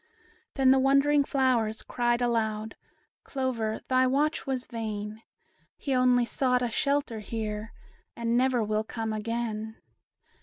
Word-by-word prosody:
Then 265 -2 +5
the 265 - +5
wondering 275 +2 +4
flowers 245 -6 +1
cried 240 0 0
aloud, 220 -2 -1 0.5
"Clover, 240 -5 -2
thy 255 0 +3
watch 290 +4 0
was 260 -2 -1
vain; 215 -1 -5 0.6
He 275 - -2
only 250 -1 +4
sought 250 0 +1
a 240 - -1
shelter 280 -3 0
here, 215 0 -4 0.4
And 235 0 -1
never 250 -1 +2
will 215 0 0
come 220 0 -4
again." 220 0 -3
240 Hz, 125 wpm, -28 LUFS, 220-260 Hz, 0.6 s, Then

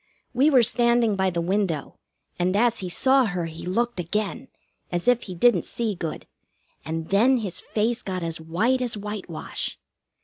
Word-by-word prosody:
We 265 +5 +4
were 260 -5 +5
standing 235 -1 +3
by 190 -1 +1
the 170 -1 -2
window, 175 -4 -1 0.4
and 180 +2 +1
as 235 +2 +2
he 185 - -4
saw 265 +7 +4
her 180 -5 -2
he 165 +1 -8
looked 235 +3 -1
again, 210 +8 -2 0.4
as 175 +3 -2
if 245 -1 +4
he 185 - -7
didn't 185 -1 +4
see 230 -3 -2
good, 170 -4 -5 0.6
and 160 0 -4
then 240 +7 +4
his 205 -7 -3
face 225 +2 -1
got 185 -2 -4
as 165 -1 -3
white 215 +11 +1
as 240 -3 -1
whitewash. 205 -5 -5
205 Hz, 170 wpm, -24 LUFS, 175-240 Hz, 0.6 s, were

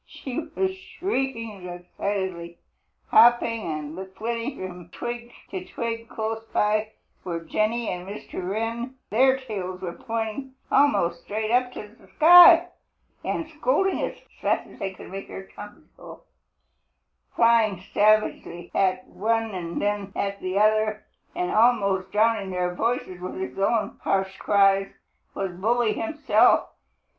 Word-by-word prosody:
She 260 0 -6 0.2
was 380 0 0
shrieking 260 - -4
excitedly. 175 -1 -4 0.5
Hopping 235 -1 +5
and 155 +5 -6
flitting 230 +3 -3
from 175 -1 -11
twig 240 +3 -6 0.2
to 190 -2 -4
twig 230 +3 -5
close 225 0 -3
by 215 +1 +1 0.3
were 170 -2 -3
Jenny 215 +6 -1
and 180 0 -4
Mr. 190 -2 -6
Wren, 230 +5 -3 0.2
their 260 +4 +4
tails 190 -7 -6 0.2
pointing 230 +4 -3 0.2
almost 175 -12 +3
straight 215 +1 -3
up 250 +1 +2
to 210 - -7
the 225 - -21
sky, 350 +1 +9 0.5
and 330 - -2
scolding 300 +10 +1
as - - -3 0.2
fast - - 0
as - - -16
they 195 - -3
could - - -11
make 195 +1 -6
their 190 - -8
tongues 205 0 -12
go. - - -12 1.1
Flying 225 -5 +3
savagely 205 -5 +1
at 185 -1 +1
one 225 +1 -1
and 170 -2 -4
then 205 -1 -2
at 200 0 -2
the 185 +1 -2
other, 215 0 +2 0.3
and 180 - -1
almost 200 -5 +2
drowning 215 -2 +2
their 180 -1 -1
voices 205 -3 -2
with 185 - -5
his 130 +6 -5
own 210 +1 0
harsh 190 0 0
cries, 195 -1 +3 0.4
was 195 -2 -2
Bully 220 +5 +1
himself. 305 -10 +3
215 Hz, 130 wpm, -25 LUFS, 190-235 Hz, 1.1 s, sky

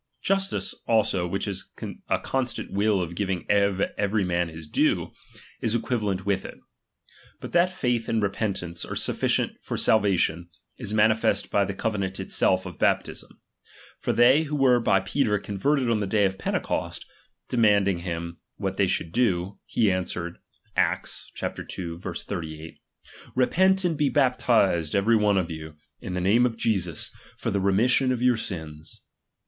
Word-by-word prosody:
Justice, 195 0 0
also, 100 -6 +2
which 95 +4 -2
is 95 -2 -5 0.4
a - - +3
constant 130 -2 -2
will 100 -1 +2
of 85 0 -6
giving 95 -1 -2
to 100 -1 +2
every 100 0 +1
man 85 -1 0
his 80 0 -10
due, 75 - +1 0.5
is 115 0 0
equivalent 105 -6 -1
with 100 -1 0
it. - - -9 0.8
But - - -8
iha.tj'aith 140 -10 +1
and 115 - +1
repeatnnce 100 -4 -2
are - - -4
sufficient - - 0
for - - -4
salvation, 90 -5 +2 0.3
is 115 -5 -3
manifest 110 -1 +2
by 100 -1 +3
the 100 - -4
cove 105 0 -1
nant 95 0 -3
itself 95 0 +1
of 90 -3 -9
baptism. - - -1 0.6
For - - -1
they 125 +5 +5
who 150 0 -3
were 130 -3 +4
by 115 - +3
Peter 115 -8 +1
converted 125 +8 0
on 115 -2 +2
the 100 - -2
day 105 0 +3
of 95 0 -2
Pentecost, - - -2 0.4
demand 105 -5 +3
ing 95 -3 0
him, 85 -1 -5 0.2
what - - -3
they - - +3
should 80 - -1
do: 100 -5 0
he 110 -4 +2
answered 90 -2 -3 0.4
(Acts - - -1
ii. 85 -3 -4
38): 80 -3 -6 0.6
Repent 190 +9 +3
and 170 -2 +1
be 145 -1 +1
baptized 120 - +2
every 105 +4 +3
one 105 -2 +3
(^'you, 80 -4 -3 0.2
in 90 - -5
the 90 - -1
name 115 +7 +4
of 115 -2 -6
Jesus, 95 -9 -1 0.3
for - - -2
the 100 - 0
remission 120 +7 +3
of' 125 -1 -1
your 125 -2 +4
sins. 80 -7 -7
100 Hz, 155 wpm, -25 LUFS, 90-120 Hz, 0.8 s, they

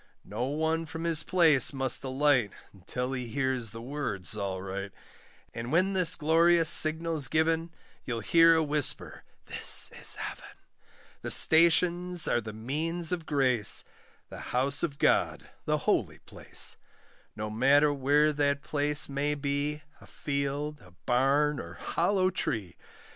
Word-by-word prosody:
No 125 - -4
one 160 +3 -2
from 160 +1 -7
his 165 -2 -1
place 160 -8 +2
must 130 -2 0
alight, 130 -5 +1 0.2
Until 125 +7 -6
he 125 -2 -4
hears 130 -2 -2
the 115 +2 -10
words, 125 -8 -5
all 100 -3 -4
right; 95 +1 -7 0.6
And 115 +1 -7
when 185 +4 +1
this 185 -3 +1
glorious 165 +2 +4
signal's 160 -2 +6
given, 160 +3 0 0.3
You'll 115 -3 -5
hear 165 +7 +4
a 160 - +1
whisper, 150 -2 -3 0.2
'This - - +4
is - - +3
Heaven;' - - -9 0.6
The - - -6
stations 170 +2 +3
are 120 - 0
the 110 0 -8
means 155 +10 -3
of 170 -3 -4
grace, 130 -7 +1 0.5
The - - -10 0.2
house 140 +2 +1
of 145 -5 -3
God, - - 0
the - - 0
holy - - -1
place; - - -2 0.6
No 105 0 -6
matter 140 +6 +3
where 145 +2 +1
that 140 -1 -1
place 150 0 -1
may 145 +1 -2
be, 145 +1 -3 0.2
A - - -16
field, 145 +1 -4
a 90 -1 -19
barn, 140 +4 +1
or - - -9
hollow 185 +2 -1
tree. 110 - -4
145 Hz, 140 wpm, -28 LUFS, 125-160 Hz, 0.6 s, signal's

